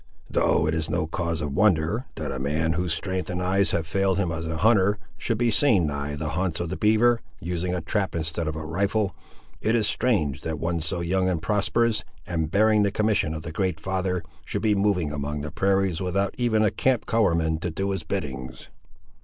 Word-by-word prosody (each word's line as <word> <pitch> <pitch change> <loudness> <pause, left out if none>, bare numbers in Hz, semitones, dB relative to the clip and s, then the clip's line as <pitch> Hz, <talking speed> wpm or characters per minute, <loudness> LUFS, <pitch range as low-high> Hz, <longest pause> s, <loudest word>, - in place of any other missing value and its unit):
"Though 80 - +2
it 80 - 0
is 80 -1 -2
no 80 0 0
cause 85 -1 -2
of 75 -2 -3
wonder, 95 - +2
that 75 -3 -4
a 65 - -4
man 80 +4 0
whose 90 +1 -1
strength 95 +2 -2
and 90 0 -2
eyes 95 +2 +2
have 85 - 0
failed 95 +3 +1
him 95 -4 0
as 80 0 -4
a 80 0 -3
hunter, 105 0 +4 0.2
should 115 - -2
be 120 0 +2
seen 110 - +4
nigh 70 0 -3
the 75 +1 -3
haunts 85 0 -1
of 85 -1 -2
the 95 - -3
beaver, 115 +3 +3 0.2
using 90 +1 -2
a 90 - -2
trap 100 +2 -1
instead 80 0 -2
of 80 - -2
a 80 0 -5
rifle, 100 +5 0 0.5
it 110 +2 +2
is 110 -3 +2
strange 100 - +1
that 80 -1 -3
one 85 +2 -1
so 85 +2 0
young 95 +2 +1
and 85 -3 -2
prosperous, 105 +2 +1 0.2
and 80 -3 -2
bearing 105 +3 +4
the 100 - +3
commission 105 -5 +1
of 75 - -6
the 85 - -6
Great 90 -1 -1
Father, 95 0 -1 0.2
should - - -4
be 110 -2 +4
moving 100 -6 +1
among 75 0 -3
the 75 0 -5
prairies, 95 -1 +1
without 95 +2 0
even 115 -3 +2
a 105 - +3
camp 130 -4 +1
colourman 85 -8 +2
to 90 - -2
do 95 +4 -2
his 95 -3 -2
biddings!" 65 -4 -5
90 Hz, 210 wpm, -25 LUFS, 80-100 Hz, 0.5 s, hunter